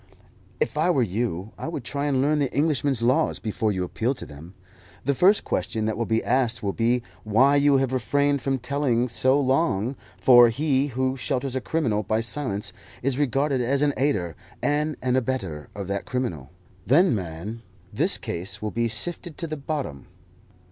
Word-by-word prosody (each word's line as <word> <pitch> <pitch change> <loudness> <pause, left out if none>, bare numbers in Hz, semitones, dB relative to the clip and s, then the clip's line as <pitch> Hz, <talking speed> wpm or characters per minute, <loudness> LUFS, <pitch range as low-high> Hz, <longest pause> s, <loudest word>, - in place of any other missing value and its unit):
"If 465 - -1
I - - +3
were 140 -8 +3
you 105 -1 -2
I - - -4
would 160 -6 -4
try 140 +3 -2
and 135 -2 +2
learn 150 +1 +2
the 140 -3 0
Englishman's 145 -5 +1
laws 130 +7 +2
before 110 0 -1
you 95 -2 -1
appeal 115 +8 -1
to - - -8
them. 80 +6 -12 0.5
The 140 - +2
first 190 +9 +4
question 110 -1 -2
that 110 -1 -1
will 115 0 -2
be 110 0 +1
asked 120 -4 +1
will 100 -1 -1
be 120 +1 +1 0.2
why 130 +7 +4
you 140 -1 +4
have 130 -1 0
refrained 140 +3 +1
from 135 0 0
telling 125 -2 0
so 130 +3 +3
long, 135 -4 +1 0.2
for 120 -2 +7
he 140 +2 +1
who 130 0 -1
shelters 130 +1 -2
a 130 - -1
criminal 120 -11 0
by 110 +1 0
silence 115 -4 -3 0.3
is 135 +1 0
regarded 140 -1 +1
as 135 +4 +1
an 145 -1 +2
aider 100 - 0 0.2
and 150 +1 0
an 125 0 +1
abettor 115 -12 -2
of 100 -2 -5
that 100 0 -2
criminal. 90 - -3 0.3
Then, 170 - +4
man, 95 +3 -5 0.3
this - - +2
case 90 +4 -4
will 105 0 -3
be 115 +1 0
sifted 165 - -3
to 170 - -4
the 155 -1 -4
bottom. 140 - -5
130 Hz, 180 wpm, -25 LUFS, 110-140 Hz, 0.5 s, for